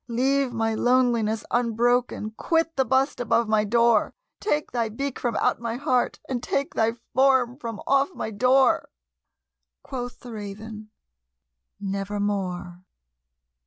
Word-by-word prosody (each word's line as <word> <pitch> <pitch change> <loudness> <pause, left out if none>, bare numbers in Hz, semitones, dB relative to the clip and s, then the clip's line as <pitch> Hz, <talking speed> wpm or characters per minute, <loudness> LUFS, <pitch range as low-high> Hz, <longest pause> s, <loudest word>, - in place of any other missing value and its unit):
Leave 265 +2 +1
my 225 -1 0
loneliness 235 -2 +2
unbroken! 240 -1 +1
quit 325 +8 0
the 265 - +3
bust 265 +3 +1
above 230 -1 +1
my 215 -1 +3
door! 235 +1 +3 0.2
Take 305 -8 -1
thy 235 -2 -1
beak 275 +5 -4
from 240 -2 -1
out - - +1
my 230 -1 -3
heart, 255 -2 0
and 250 -3 -2
take 280 +2 -2
thy 225 0 +1 0.2
form 260 -2 +3
from 230 -6 -5
off 275 +2 +3
my 220 - -4
door!" 255 +5 +3 0.9
Quoth 245 -1 -6
the 245 - -9
Raven, 215 +1 -8 0.9
"Nevermore." 195 -3 -3
235 Hz, 125 wpm, -25 LUFS, 215-260 Hz, 0.9 s, the